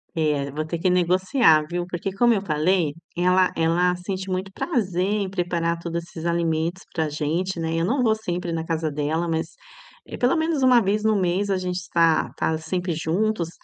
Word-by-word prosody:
É, 150 Hz, -3 st, 0 dB
vou 155 Hz, +2 st, -3 dB
ter 165 Hz, +1 st, -4 dB
que 185 Hz, +2 st, +2 dB
negociar 180 Hz, -, +3 dB
viu? 175 Hz, 0 st, -2 dB
Porque, 180 Hz, +2 st, -4 dB
como 240 Hz, +4 st, +3 dB
eu 200 Hz, -, 0 dB
falei, 160 Hz, -2 st, +1 dB, 0.2 s
ela 180 Hz, +1 st, +3 dB
ela 175 Hz, +2 st, +2 dB
sente 190 Hz, +1 st, -5 dB
muito 185 Hz, +1 st, -3 dB
prazer 190 Hz, -, -1 dB
em 205 Hz, -1 st, -1 dB
preparar 170 Hz, -2 st, -1 dB
todos 170 Hz, 0 st, -4 dB
esses 165 Hz, -1 st, -9 dB
alimentos 170 Hz, +1 st, -1 dB
pra 160 Hz, -2 st, -1 dB
gente, 165 Hz, +5 st, -2 dB
né, 165 Hz, 0 st, -2 dB
eu 165 Hz, 0 st, +1 dB
não 255 Hz, +8 st, +1 dB
vou 220 Hz, -3 st, +3 dB
sempre 180 Hz, -5 st, -4 dB
na 165 Hz, 0 st, -3 dB
casa 160 Hz, -1 st, -1 dB
dela, 150 Hz, +4 st, -1 dB
mas 160 Hz, -, -2 dB, 0.6 s
pelo 250 Hz, +6 st, +3 dB
menos 320 Hz, -3 st, 0 dB
uma 250 Hz, -2 st, +6 dB
vez 210 Hz, +2 st, 0 dB
no 220 Hz, -1 st, +3 dB
mês 185 Hz, +2 st, 0 dB
a 195 Hz, -, +1 dB
gente 180 Hz, -1 st, -3 dB
está 165 Hz, -3 st, +2 dB
tá 160 Hz, -, 0 dB
sempre 175 Hz, +2 st, -3 dB
juntos, 170 Hz, +3 st, -1 dB
175 Hz, 190 wpm, -23 LUFS, 165-190 Hz, 0.6 s, uma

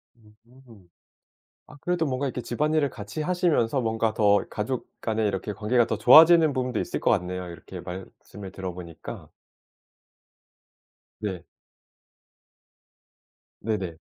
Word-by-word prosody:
음. 115 Hz, -2 st, -20 dB, 0.8 s
아 150 Hz, -, -14 dB
그래도 175 Hz, -2 st, 0 dB
뭔가 135 Hz, 0 st, -1 dB
이렇게 125 Hz, -1 st, -4 dB
집안일을 150 Hz, +5 st, 0 dB
같이 105 Hz, +6 st, -7 dB
하시면서 150 Hz, -7 st, +1 dB
뭔가 115 Hz, -1 st, 0 dB
더 105 Hz, -2 st, +4 dB
이 -, -, -17 dB
가족 115 Hz, +4 st, -3 dB
간에 110 Hz, -1 st, -1 dB
이렇게 100 Hz, +1 st, -3 dB
관계가 110 Hz, +4 st, +1 dB
더 110 Hz, -, -1 dB
좋아지는 155 Hz, +6 st, +7 dB
부분도 125 Hz, -3 st, -1 dB
있을 -, -, -3 dB
것 -, -, +1 dB
같네요. 90 Hz, 0 st, -2 dB
이렇게 85 Hz, -, -9 dB
말씀을 95 Hz, +2 st, -9 dB
들어 95 Hz, -2 st, -6 dB
보니까. 85 Hz, -2 st, -9 dB, 1.9 s
네. 95 Hz, -5 st, -5 dB, 2.2 s
네네. 95 Hz, -6 st, -3 dB
110 Hz, 265 characters per minute, -26 LUFS, 100-130 Hz, 2.2 s, 좋아지는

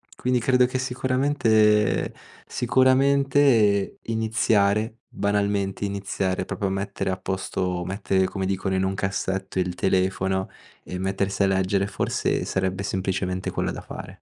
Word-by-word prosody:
Quindi 125 Hz, 0 st, 0 dB
credo 125 Hz, +1 st, +3 dB
che 130 Hz, +1 st, -2 dB
sicuramente 125 Hz, -5 st, +2 dB, 0.3 s
sicuramente 130 Hz, -4 st, +3 dB
iniziare, 110 Hz, -1 st, +1 dB
banalmente 100 Hz, -1 st, -1 dB
iniziare, 95 Hz, -2 st, -2 dB
proprio 100 Hz, -, -2 dB
a -, -, -3 dB
mettere 95 Hz, 0 st, -3 dB
a 95 Hz, -, -2 dB
posto, 95 Hz, -1 st, -2 dB
mettere 95 Hz, 0 st, 0 dB
come 95 Hz, 0 st, -3 dB
dicono 95 Hz, 0 st, -1 dB
in 95 Hz, -, +1 dB
un 95 Hz, 0 st, 0 dB
cassetto 95 Hz, -1 st, -2 dB
il 90 Hz, -1 st, -1 dB
telefono 95 Hz, 0 st, 0 dB, 0.3 s
e 90 Hz, -, -6 dB
mettersi 95 Hz, +1 st, -1 dB
a -, -, +4 dB
leggere 95 Hz, +1 st, +1 dB
forse 105 Hz, -, -1 dB
sarebbe 95 Hz, 0 st, -1 dB
semplicemente 95 Hz, -1 st, -2 dB
quella -, -, -1 dB
da -, -, -6 dB
fare. -, -, -10 dB
100 Hz, 130 wpm, -24 LUFS, 95-110 Hz, 0.3 s, a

